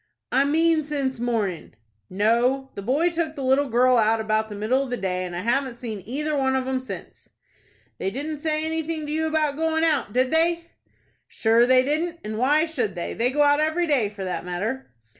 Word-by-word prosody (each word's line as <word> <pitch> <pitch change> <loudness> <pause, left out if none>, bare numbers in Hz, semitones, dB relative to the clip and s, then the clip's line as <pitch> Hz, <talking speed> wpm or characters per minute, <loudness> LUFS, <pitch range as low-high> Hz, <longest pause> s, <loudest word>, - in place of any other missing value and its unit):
"I 270 +3 +3
mean 320 +2 +3
since 280 -4 -2
morning." 215 - -2 0.3
"No; 240 +7 +1
the - - -6
boy 285 - +1
took 325 -2 -2
the 275 - -5
little 265 +2 +2
girl 250 +2 +4
out 225 0 +3
about 220 0 0
the 210 - -7
middle 220 +6 +1
of 275 - -4
the 245 - -2
day, 185 -2 -2
and 175 -1 -6
I 175 - -3
haven't 250 +3 0
seen 225 -4 -6
either 300 +5 -2
one 265 -1 +1
of 260 -1 -1
'em 265 0 0
since." 255 - -9 0.7
"They 190 - -1
didn't 290 +7 -5
say 310 0 -1
anything 320 -1 -2
to 295 - -5
you 315 +1 0
about 305 -2 0
going 320 0 0
out, 300 -9 +1
did 255 +3 +1
they?" 335 +1 +1 0.6
"Shure 230 +2 +3
they 255 0 +5
didn't, 325 +5 -1
and 215 +1 -4
why 295 +5 +3
should 245 - -3
they? 170 - -4
They 235 +3 0
go 295 +3 +2
out 290 0 +4
every 315 +3 +1
day, 270 -10 +1
for 205 -2 -8
that 185 -1 -3
matter." 205 +9 -4
265 Hz, 210 wpm, -24 LUFS, 225-310 Hz, 0.7 s, they